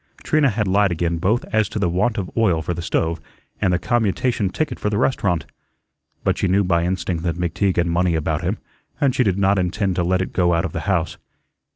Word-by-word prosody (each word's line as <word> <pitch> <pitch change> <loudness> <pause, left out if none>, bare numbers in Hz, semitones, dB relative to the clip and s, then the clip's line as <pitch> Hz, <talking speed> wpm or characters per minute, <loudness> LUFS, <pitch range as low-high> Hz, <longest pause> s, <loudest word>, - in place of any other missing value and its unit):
Trina 150 -3 +3
had 105 -2 -1
lied 100 0 +3
again 85 0 -1
both 105 +8 +1
as 110 -1 +2
to - - -5
the 100 -3 +1
want 105 +7 0
of 95 -3 -3
oil 95 -9 +2
for 90 - -2
the 85 - -5
stove 85 -1 -1 0.4
and 90 - +2
the 90 - +2
commutation 105 +2 0
ticket 125 +7 -3
for 105 - -1
the 105 - -1
restaurant. 100 -9 0 0.8
But - - 0
she - - +1
knew 95 +2 +3
by 85 -2 +1
instinct 90 -2 -2
that 85 -1 -1
McTeague 90 +2 0
had 85 - +3
money 85 0 +1
about 80 0 -1
him, 95 +4 -1 0.4
and 140 -4 +2
she 130 - +2
did 95 -4 +1
not 100 0 +3
intend 95 +1 -1
to 90 - +2
let 90 +2 +1
it - - -7
go 85 -2 +2
out 85 +2 0
of 80 - -5
the - - -2
house. - - 0
95 Hz, 230 wpm, -21 LUFS, 85-105 Hz, 0.8 s, Trina